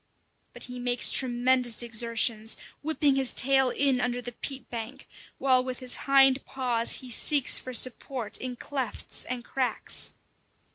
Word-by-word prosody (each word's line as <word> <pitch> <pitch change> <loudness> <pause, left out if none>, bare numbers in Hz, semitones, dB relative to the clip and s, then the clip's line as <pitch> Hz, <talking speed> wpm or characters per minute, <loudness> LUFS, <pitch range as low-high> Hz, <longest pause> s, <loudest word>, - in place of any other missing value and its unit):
But - - -10
he 250 0 -8
makes 245 -1 +3
tremendous 245 -2 +3
exertions, 230 -1 0 0.2
whipping 295 -2 0
his 265 -2 +1
tail 265 0 +3
in 265 -1 +1
under 245 0 -2
the 245 0 -7
peat 265 +1 -7
bank, 240 +3 -7 0.3
while 255 -2 +2
with 255 -1 -5
his 255 -2 +1
hind 270 -1 +4
paws 245 -3 -1
he 255 -1 -11
seeks 280 +3 +3
for 255 - -9
support 250 -1 0
in 255 -1 -6
clefts 265 0 -2
and 245 -1 -6
cracks. 260 -2 -2
255 Hz, 145 wpm, -26 LUFS, 240-270 Hz, 0.3 s, hind